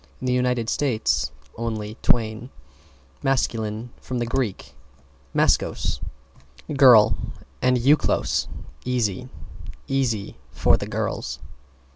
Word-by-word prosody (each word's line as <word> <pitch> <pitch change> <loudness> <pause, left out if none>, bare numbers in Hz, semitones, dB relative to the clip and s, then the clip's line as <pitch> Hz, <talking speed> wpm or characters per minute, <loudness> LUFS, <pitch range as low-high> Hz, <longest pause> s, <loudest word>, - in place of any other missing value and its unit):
In - - -6
the 125 - +2
United 125 -2 +1
States, 125 -3 +1 0.3
only 110 -2 -3
Twain. 115 +1 +1 0.7
=MASCULINE= 115 -3 -1
From 125 -1 -3
Grk. 120 -3 -2 0.6
maskos, - - +1 0.8
girl, 125 -7 +7 0.5
and 125 0 +3
eukolos, 140 +5 +2 0.4
easy. 125 -1 -1 0.6
Easy 120 - -1
for 65 - +3
the - - -3
girls. - - -3
120 Hz, 90 wpm, -24 LUFS, 110-125 Hz, 0.8 s, girl